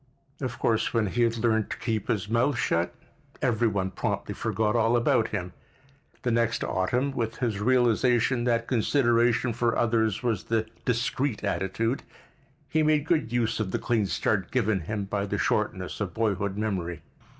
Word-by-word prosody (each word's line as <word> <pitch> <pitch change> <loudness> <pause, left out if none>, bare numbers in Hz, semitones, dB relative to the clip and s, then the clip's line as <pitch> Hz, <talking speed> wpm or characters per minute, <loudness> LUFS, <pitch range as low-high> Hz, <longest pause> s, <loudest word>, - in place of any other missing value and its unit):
Of 125 -3 -3
course 115 0 0
when 115 -2 +3
he 115 +5 -1
had 115 -1 +2
learned 110 -2 +1
to - - -4
keep 110 -4 -2
his 105 -3 -1
mouth 120 +4 +1
shut 85 -7 +1 0.5
every 120 0 +2
one 95 -3 -1
promptly - - -2
forgot 110 0 0
all 115 +1 +3
about 115 -1 +2
him. 90 -4 -4 0.7
The 125 - +1
next 115 0 +1
autumn, 125 +9 0
with 115 -3 -3
his 115 -5 -1
realization 120 0 +3
that 115 -1 +1
consideration 120 -1 +2
for 120 0 0
others 110 -2 +1
was 115 -6 -1
the 110 -1 0 0.2
discreet 125 0 -1
attitude, 100 +6 -1 0.7
he 160 - +1
made 155 -1 +2
good 155 -8 +1
use 120 -2 0
of 110 -3 -1
the - - -1
clean 110 -4 0
start 95 +3 0
given 110 -5 +1
him 100 +4 -3
by 100 0 -2
the - - -2
shortness - - -1
of - - -3
boyhood 100 -3 0
memory. 90 -6 -2
115 Hz, 165 wpm, -27 LUFS, 105-120 Hz, 0.7 s, when